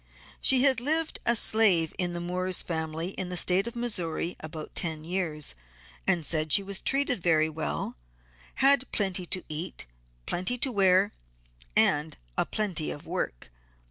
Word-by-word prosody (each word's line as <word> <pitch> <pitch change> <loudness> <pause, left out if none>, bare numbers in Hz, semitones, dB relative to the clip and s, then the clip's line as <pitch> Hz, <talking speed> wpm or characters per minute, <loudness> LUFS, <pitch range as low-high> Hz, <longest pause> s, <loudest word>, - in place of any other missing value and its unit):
She 265 -1 +5
had 265 -3 +6
lived 315 +5 +1
a 235 - +4
slave 200 -8 +4
in 180 -1 0
Moore's 185 +1 -1
family 160 0 -3
in 190 -2 -4
the 180 - -3
State 185 +5 +2
of 235 - -7
Missouri 180 -8 -1
about 155 0 -8
ten 160 -2 -1
years 160 -4 -2 0.5
and 170 -3 +1
said 155 -1 -1
she 200 - +6
was 195 0 -1
treated 275 -6 0
very 160 -2 +2
well, 155 - -4 0.6
had 270 -1 +3
plenty 190 -3 0
to 185 - -1
eat, 155 - -5 0.4
plenty 185 +8 0
to 260 +2 -1
wear, 195 -1 +4 0.6
and 150 +2 +2 0.2
a - - 0
plenty 185 -8 -2
of 145 - -7
work. - - -4
180 Hz, 150 wpm, -27 LUFS, 160-220 Hz, 0.6 s, had